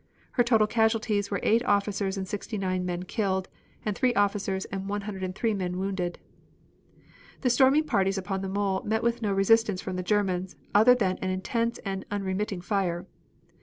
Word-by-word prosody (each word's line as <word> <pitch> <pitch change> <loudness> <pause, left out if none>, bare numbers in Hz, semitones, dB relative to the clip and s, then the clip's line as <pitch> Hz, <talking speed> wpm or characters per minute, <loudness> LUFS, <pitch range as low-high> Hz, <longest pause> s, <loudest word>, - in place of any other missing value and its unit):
Her 245 - +3
total 225 -3 +4
casualties 220 -2 +1
were 200 - -1
eight 230 +2 +3
officers 200 -1 0
and 190 -1 -3
sixty 210 +2 -4
nine 185 -2 -1
men 175 0 -3
killed, 190 -1 -1 0.4
and 210 -2 -1
three 250 +1 +1
officers 200 -1 0
and 195 0 -5
103 200 +1 -2
men 180 -3 -2
wounded. 190 -2 -2 1.2
The 250 - +2
storming 265 +5 +5
parties 195 -8 +1
upon 195 0 -3
the 195 - -3
mole 195 -1 0
met 220 +1 0
with 235 0 0
no 210 -2 0
resistance 205 0 +3
from 185 0 -4
the - - -1
Germans 185 -2 0 0.2
other 225 +5 +7
than 190 -6 0
an 190 - -2
intense 230 +5 -1
and 195 -1 -3
unremitting 195 -1 -2
fire. 180 -3 -1
200 Hz, 165 wpm, -27 LUFS, 190-220 Hz, 1.2 s, other